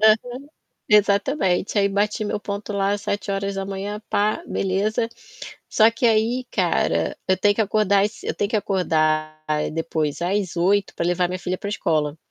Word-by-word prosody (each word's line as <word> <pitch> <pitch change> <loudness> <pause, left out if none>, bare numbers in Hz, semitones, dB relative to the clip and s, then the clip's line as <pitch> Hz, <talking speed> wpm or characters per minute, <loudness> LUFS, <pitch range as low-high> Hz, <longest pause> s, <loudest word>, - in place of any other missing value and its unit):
Aham, 215 0 +7 0.7
exatamente. 205 -1 +2
Aí 200 0 +3
bati 210 +2 0
meu 210 0 -2
ponto 205 +1 -5
lá 200 +1 +1
7h 200 0 -3
pá, 210 +9 +1
beleza. 205 +4 0 0.6
Só 220 +1 +5
que 230 +2 -1
aí, 230 +3 +1
cara, - - 0
eu 185 0 +3
tenho 205 +1 +3
que - - +2
acordar 200 -1 +2
es 210 +1 -7
eu - - -2
tenho 200 - -1
que 220 - +1
acordar, 155 -6 0
aí 150 0 -1
depois 160 -1 -2
às 185 0 -1
8h 195 +3 +2
pra 170 - -2
levar 175 +1 +1
minha 185 +1 -4
filha 185 +1 -3
pra 200 - -5
escola. 155 -6 -1
200 Hz, 160 wpm, -22 LUFS, 180-210 Hz, 0.7 s, Aham